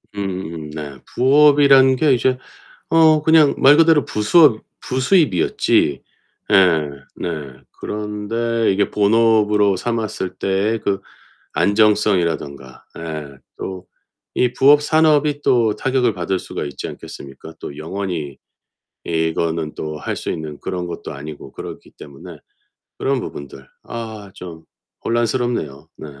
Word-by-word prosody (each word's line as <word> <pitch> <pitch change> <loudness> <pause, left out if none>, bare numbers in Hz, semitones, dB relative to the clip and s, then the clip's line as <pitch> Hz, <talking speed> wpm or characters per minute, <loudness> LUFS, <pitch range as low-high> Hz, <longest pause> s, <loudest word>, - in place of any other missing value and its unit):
음음음. 90 -6 -5
네, 75 -3 -7
부업이란 140 0 +5
게 145 0 +3
이제 130 +1 +1 0.5
어 160 -2 +5
그냥 160 -2 +5
말 145 +3 +6
그대로 160 -3 +4
부수업 110 +3 +4 0.2
부수입이었지 130 - +1 0.5
예 85 -6 +4 0.3
네. - - -5 0.5
그런데 105 +2 -2
이게 100 +1 0
본업으로 105 -1 +3
삼았을 110 -4 -3
때에 100 +4 0
그 100 -1 -2 0.5
안정성이라던가 90 -10 0 0.2
예 75 -4 -7 0.2
또 95 -1 -7 0.5
이 125 -1 +2
부업 145 +2 +5
산업이 150 -1 +2
또 115 -4 +2
타격을 130 -4 +1
받을 90 +1 -2
수가 - - -6
있지 70 -2 -6
않겠습니까? 70 +4 -11
또 70 - -8
영원히 80 -4 -5 0.7
이거는 80 -1 -1
또 75 -1 -6
할 - - -4
수 - - -4
있는 75 -2 -5
그런 90 -1 -4
것도 85 - -7
아니고 75 +2 -9
그렇기 - - -9
때문에 70 -1 -12 0.6
그런 135 -1 0
부분들 70 - -9 0.2
아 110 -4 -7
좀 85 -3 -10 0.4
혼란스럽네요. 115 - -2
네. - - -9
105 Hz, 260 characters per minute, -19 LUFS, 80-125 Hz, 0.7 s, 말